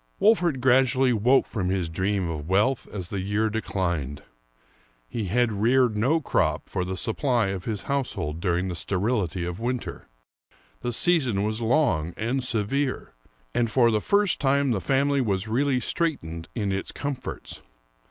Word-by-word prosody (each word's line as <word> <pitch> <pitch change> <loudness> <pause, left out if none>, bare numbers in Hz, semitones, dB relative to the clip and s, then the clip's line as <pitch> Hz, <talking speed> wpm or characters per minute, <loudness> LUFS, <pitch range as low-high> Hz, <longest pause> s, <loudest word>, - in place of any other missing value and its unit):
Wolfert 175 - +3
gradually 130 0 +4
woke 125 +5 +3
from 95 -5 -3
his 95 -3 0
dream 95 +3 -1
of 80 -1 -5
wealth 105 +7 +2
as 95 -4 -5
the 100 - -3
year 105 +3 0
declined. 85 -10 -2 0.8
He 110 - -3
had 115 +5 +1
reared 115 +3 +2
no 130 +10 +2
crop 80 - 0
for 90 - -2
the 95 +1 -4
supply 115 - +1
of 95 -2 -4
his 105 -3 -3
household 125 - -2
during 90 0 0
the 90 - -3
sterility 95 -1 -1
of 90 +2 -5
winter. 120 +1 -4 0.7
The 120 - -2
season 125 - +2
was 110 +2 -2
long 110 - +1
and 120 +4 -1
severe, 125 +4 -1 0.4
and 120 -1 +1
for 120 0 +4
the 110 -1 +1
first 200 - +2
time 140 -1 +2
the 100 -5 0
family 140 +3 +2
was 100 -3 -1
really 130 +3 +1
straitened 85 - -2
in 105 -4 -1
its 95 0 -3
comforts. 140 -3 -5
110 Hz, 155 wpm, -25 LUFS, 95-130 Hz, 0.8 s, gradually